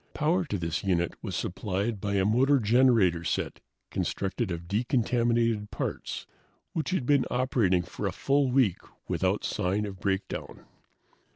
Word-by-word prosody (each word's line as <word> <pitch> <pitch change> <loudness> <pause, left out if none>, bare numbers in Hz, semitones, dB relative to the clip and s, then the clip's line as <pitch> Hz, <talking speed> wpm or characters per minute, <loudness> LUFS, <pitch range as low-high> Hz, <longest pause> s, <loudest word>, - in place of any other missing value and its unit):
Power 175 +5 +2
to 105 - -2
this 85 -3 -2
unit 85 -3 +1
was - - -4
supplied 100 +2 -2
by 100 -1 -1
a 95 -1 +2
motor 130 +7 +4
generator 110 -7 +4
set - - -2 0.3
constructed 100 +3 -2
of 85 -1 -5
decontaminated 115 0 +1
parts, - - -4 0.5
which 160 - -2
had 185 -9 0
been 140 -1 +4
operating 115 -8 +2
for - - -4
a - - -1
full 140 -1 +1
week 125 -9 +3 0.3
without - - 0
sign 100 +4 0
of 95 -2 -7
breakdown. 95 0 -3
105 Hz, 145 wpm, -28 LUFS, 95-125 Hz, 0.5 s, motor